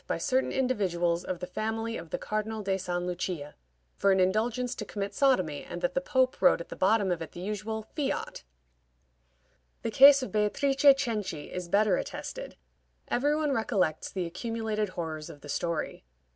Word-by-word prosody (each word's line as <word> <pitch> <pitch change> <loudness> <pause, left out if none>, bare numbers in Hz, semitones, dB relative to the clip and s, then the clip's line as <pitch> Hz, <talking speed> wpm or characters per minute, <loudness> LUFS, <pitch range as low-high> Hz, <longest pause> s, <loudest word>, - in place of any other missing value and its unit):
by - - -1
certain 260 -1 +1
individuals 180 -9 0
of 185 - -3
the 180 - -5
family 220 +4 -3
of 165 -5 -7
the - - -2
Cardinal 215 -1 -3
of 190 -1 +1
St. 175 -1 -2
Lucia 175 -4 -4 0.4
for 200 - +3
an 190 - +3
indulgence 225 +7 +1
to 235 - -5
commit 200 -1 -4
sodomy, 185 - +2
and 175 +1 -7
that 175 - +1
the 270 - 0
Pope 260 -2 +1
wrote 270 - +5
at 170 - -8
the - - -6
bottom 200 0 +2
of 170 -2 -1
it 165 - -7
the - - -8
usual 210 +3 -3
"Fiat." 295 -3 -2 1.4
The 230 - -1
case 275 +3 +8
of 215 - -5
Beatrice 215 +7 +1 0.2
Cenci 210 - -3
is 180 -1 -5
better 210 +3 +3
attested. - - -6 0.5
Every 290 +4 +2
one 305 -2 0
recollects 195 - 0
the 185 -2 -2
accumulated 215 +3 -2
horrors 160 -4 -5
of 145 - -11
the 145 - -11
story. 170 - -2
210 Hz, 175 wpm, -29 LUFS, 175-235 Hz, 1.4 s, case